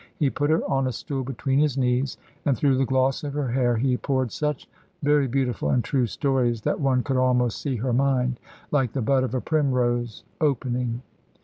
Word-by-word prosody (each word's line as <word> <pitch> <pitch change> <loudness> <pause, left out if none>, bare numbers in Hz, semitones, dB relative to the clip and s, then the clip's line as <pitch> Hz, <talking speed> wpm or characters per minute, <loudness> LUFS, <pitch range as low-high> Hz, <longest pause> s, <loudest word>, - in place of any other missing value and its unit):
He 145 -7 +1
put 145 0 -1
her 160 +1 +2
on 135 -1 +1
a - - -1
stool 135 +2 -4
between 135 +1 -1
his 145 -3 +2
knees, 130 +1 0 0.3
and 135 -4 +1
through 140 +1 +3
the 135 - +1
gloss 130 +1 +1
of 145 -1 -4
her 145 -4 -1
hair 120 -2 +2
he 125 +1 +1
poured 130 -4 -1
such 150 -2 -2 0.4
very 145 -1 +3
beautiful 130 -1 -1
and 125 - +2
true 130 -4 +1
stories, 120 +1 0
that - - 0
one 130 -3 +2
could 135 -2 -1
almost 125 -2 +2
see 140 -3 -2
her 125 +2 -1
mind 130 -1 +1 0.3
(like 135 -6 +1
the 135 - -1
bud 135 +3 +3
of 130 -1 -2
a 130 - 0
primrose) 125 -6 0 0.2
opening. 125 -4 0
130 Hz, 200 wpm, -25 LUFS, 125-140 Hz, 0.4 s, through